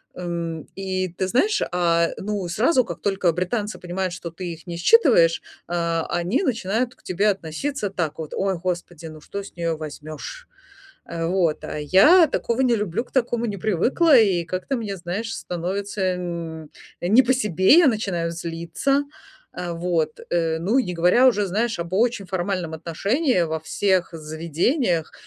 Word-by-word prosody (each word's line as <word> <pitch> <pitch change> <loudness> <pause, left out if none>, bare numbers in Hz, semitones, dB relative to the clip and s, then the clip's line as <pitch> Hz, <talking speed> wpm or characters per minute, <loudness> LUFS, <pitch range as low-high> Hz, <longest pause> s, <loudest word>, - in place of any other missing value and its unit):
эм, 170 -3 -4
и 190 -1 -2
ты 185 +2 -3
знаешь, 390 - +2
а, 170 -1 +2
ну 200 -2 -3
сразу 250 - +2
как - - -7
только 195 -3 +1
британцы 205 +5 -2
понимают, 180 0 -3
что 170 -2 -7
ты 175 0 -6
их 165 +2 -14
не 170 -1 -5
считываешь, 175 - +5 0.3
э, 170 -1 0
они 175 - 0
начинают 235 - -1
к - - -29
тебе 200 +4 +1
относиться 200 - -3
так 165 -6 -3
вот: 155 - -6
"Ой, 195 -2 0
господи, 175 -2 -4
ну 155 -1 -11
что 200 +4 -6
с - - -13
нее 165 -1 -1
возьмешь!" 155 - -8 0.6
Э, 165 -1 -4
вот, 170 -3 0
а 150 - -5
я 300 - +6
такого 235 -2 -1
не 240 -3 +3
люблю, 210 +3 -2
к - - -26
такому 240 -2 0
не 205 -2 -3
привыкла. 245 - +3
И 185 -6 +3
как-то 185 +10 -3
мне, 205 -4 -4
знаешь, 195 +6 -4
становится 185 +1 -2
нь 165 -3 -5 0.3
не 215 +9 +5
по 255 +2 +2
себе. 210 - +4
Я 345 - +6
начинаю 190 -7 -1
злиться. 170 - -1 0.5
Э, 175 -1 -4
вот, 165 -2 -1
э, 165 -2 +1
ну, 215 +10 +2
не 180 -8 -1
говоря 180 +10 +4
уже, 210 -5 +3
знаешь, 220 +2 -1
об 170 +1 -6
очень 225 -1 +1
формальном 180 -3 -2
отношении 195 - 0
во 160 -1 -1
всех 190 +2 0
заведениях. 165 - -1
185 Hz, 165 wpm, -23 LUFS, 170-220 Hz, 0.6 s, я